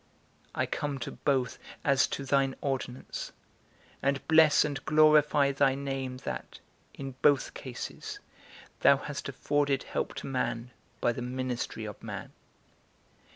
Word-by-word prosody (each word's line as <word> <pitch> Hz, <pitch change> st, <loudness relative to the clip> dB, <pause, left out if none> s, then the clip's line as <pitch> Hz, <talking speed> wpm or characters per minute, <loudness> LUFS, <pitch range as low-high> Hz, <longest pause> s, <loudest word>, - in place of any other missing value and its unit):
I -, -, +1 dB
come 145 Hz, -2 st, -2 dB
to -, -, -4 dB
both 130 Hz, -4 st, 0 dB, 0.2 s
as 135 Hz, -2 st, +4 dB
to 140 Hz, -, -4 dB
thine 135 Hz, 0 st, +2 dB
ordinance, 130 Hz, -2 st, -4 dB, 0.7 s
and 140 Hz, 0 st, 0 dB
bless 160 Hz, -2 st, +6 dB
and 145 Hz, -3 st, -3 dB
glorify 150 Hz, -2 st, +5 dB
thy 135 Hz, -1 st, +3 dB
name 135 Hz, -2 st, -3 dB
that, -, -, -5 dB, 0.4 s
in 135 Hz, -1 st, -5 dB
both 145 Hz, -2 st, +4 dB
cases, 130 Hz, -3 st, -6 dB, 0.6 s
thou 140 Hz, -, +6 dB
hast 145 Hz, 0 st, -5 dB
afforded 140 Hz, 0 st, +1 dB
help -, -, -3 dB
to -, -, -6 dB
man 125 Hz, -2 st, -2 dB, 0.3 s
by 120 Hz, -, +3 dB
the 120 Hz, -, -5 dB
ministry 125 Hz, -3 st, -3 dB
of 105 Hz, -1 st, -8 dB
man. -, -, -6 dB
135 Hz, 130 wpm, -30 LUFS, 130-145 Hz, 0.7 s, bless